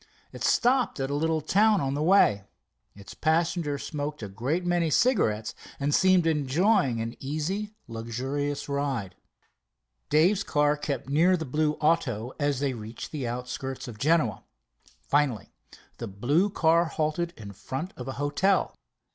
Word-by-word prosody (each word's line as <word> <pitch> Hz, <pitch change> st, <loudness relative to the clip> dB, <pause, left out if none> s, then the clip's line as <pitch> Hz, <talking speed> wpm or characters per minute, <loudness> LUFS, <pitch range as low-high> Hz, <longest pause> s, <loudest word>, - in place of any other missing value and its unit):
It -, -, -8 dB
stopped 250 Hz, -, +2 dB
at 135 Hz, +1 st, -2 dB
a -, -, -1 dB
little 160 Hz, +2 st, 0 dB
town 205 Hz, +6 st, +3 dB
on 135 Hz, -3 st, -1 dB
the 145 Hz, -, -2 dB
way. 155 Hz, -, +4 dB, 0.5 s
Its 100 Hz, -1 st, -11 dB
passenger 160 Hz, -2 st, 0 dB
smoked 145 Hz, -2 st, -5 dB
a -, -, -4 dB
great 130 Hz, -, -2 dB
many 175 Hz, -2 st, +1 dB
cigarettes, 125 Hz, -, +2 dB, 0.3 s
and 145 Hz, +1 st, 0 dB
seemed 185 Hz, -1 st, +4 dB
enjoying 150 Hz, -, +2 dB
an 115 Hz, +1 st, -4 dB
easy, 185 Hz, +10 st, -3 dB
luxurious 130 Hz, +6 st, -3 dB
ride. 140 Hz, -9 st, -2 dB, 1.0 s
Dave's 175 Hz, +7 st, +4 dB
car 145 Hz, 0 st, +2 dB
kept 145 Hz, -4 st, -4 dB
near 160 Hz, +7 st, +3 dB
to -, -, +3 dB
the 160 Hz, -, -4 dB
blue 150 Hz, +3 st, 0 dB
auto 130 Hz, -8 st, 0 dB
as 145 Hz, -3 st, 0 dB
they 140 Hz, -2 st, 0 dB
reached 110 Hz, 0 st, -8 dB
the 140 Hz, -6 st, -3 dB
outskirts 125 Hz, +2 st, -5 dB
of 110 Hz, -3 st, -9 dB
Genoa. 140 Hz, -, +1 dB, 0.6 s
Finally 140 Hz, -8 st, 0 dB, 0.5 s
the 115 Hz, -, -5 dB
blue 140 Hz, -, +1 dB
car 170 Hz, -3 st, +3 dB
halted 160 Hz, +2 st, -2 dB
in 100 Hz, -2 st, -9 dB
front 135 Hz, -, -6 dB
of 125 Hz, -, -8 dB
a 135 Hz, -, -3 dB
hotel. 145 Hz, +8 st, +1 dB
145 Hz, 150 wpm, -27 LUFS, 125-165 Hz, 1.0 s, way